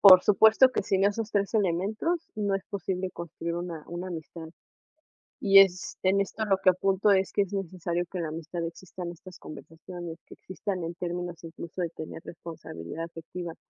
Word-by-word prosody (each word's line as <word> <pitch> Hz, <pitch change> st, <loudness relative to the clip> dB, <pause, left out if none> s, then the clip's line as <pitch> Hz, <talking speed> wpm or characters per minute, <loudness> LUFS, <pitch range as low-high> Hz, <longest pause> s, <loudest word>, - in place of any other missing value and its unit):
Por 185 Hz, -2 st, +10 dB
supuesto 220 Hz, +5 st, +6 dB
que, -, -, 0 dB
sin 195 Hz, 0 st, +2 dB
esos 210 Hz, +2 st, 0 dB
3 200 Hz, +1 st, 0 dB
elementos 210 Hz, -, +1 dB, 0.2 s
no 205 Hz, -2 st, 0 dB
es 195 Hz, 0 st, -2 dB
posible 190 Hz, -2 st, -3 dB
construir 170 Hz, 0 st, -5 dB
una 170 Hz, -3 st, -5 dB
una 175 Hz, +2 st, -5 dB
amistad. 160 Hz, -1 st, -7 dB, 0.9 s
Y 195 Hz, 0 st, +8 dB
es 185 Hz, -2 st, +3 dB
en 195 Hz, +1 st, +4 dB
esto 220 Hz, +3 st, -2 dB
lo 195 Hz, -2 st, +3 dB
que 185 Hz, -, +7 dB
apunto 195 Hz, +2 st, +2 dB
es 190 Hz, -1 st, +3 dB
que -, -, +3 dB
es 195 Hz, -, -9 dB
necesario 175 Hz, -2 st, -2 dB
que 190 Hz, -, -4 dB
en 170 Hz, -, -1 dB
la 160 Hz, -, -2 dB
amistad 165 Hz, +2 st, -4 dB
existan 175 Hz, +1 st, -7 dB
estas 180 Hz, +2 st, -12 dB
conversaciones, 165 Hz, +2 st, -9 dB
que -, -, -13 dB
existan 190 Hz, 0 st, -4 dB
en 170 Hz, +1 st, -4 dB
términos, 175 Hz, -1 st, -4 dB
incluso 170 Hz, +2 st, -7 dB
de 170 Hz, -, 0 dB
tener 160 Hz, 0 st, -8 dB
responsabilidad 165 Hz, -, -7 dB
efectiva. 165 Hz, +1 st, -7 dB
180 Hz, 180 wpm, -28 LUFS, 170-195 Hz, 0.9 s, Por